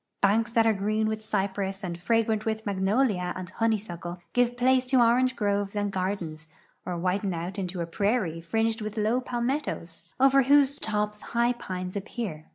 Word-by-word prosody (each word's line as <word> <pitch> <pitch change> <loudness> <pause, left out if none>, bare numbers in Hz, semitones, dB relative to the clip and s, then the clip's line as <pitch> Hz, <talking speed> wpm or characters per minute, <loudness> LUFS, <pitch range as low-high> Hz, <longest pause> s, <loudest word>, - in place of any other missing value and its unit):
Banks 225 +4 +2
that 225 -2 +4
are 225 - +4
green 215 +2 0
with 220 0 -2
cypress 195 -1 -2
and 175 -2 -5
fragrant 220 +1 +1
with 220 0 -2
magnolia 195 -1 +1
and 185 0 -7
hone3^suckle 195 -6 -2 0.2
give 245 0 +2
place 255 +1 +4
to 255 0 +4
orange 250 +2 +4
groves 205 -1 -1
and 205 -1 0
gardens, 185 -5 -3 0.4
or 180 -1 -2
widen 185 +2 0
out 175 +4 -4
into 180 -1 -3
a - - -1
prairie 190 -2 0
fringed 225 +6 0
with 215 +1 -5
low 220 +4 +1
palmettos, 240 - -3 0.2
over 270 +1 +6
whose 280 +1 +4
tops 210 -1 -1
high 235 +1 +1
jiiues 185 -5 -6
appear. 195 -6 -5
210 Hz, 165 wpm, -27 LUFS, 185-235 Hz, 0.4 s, over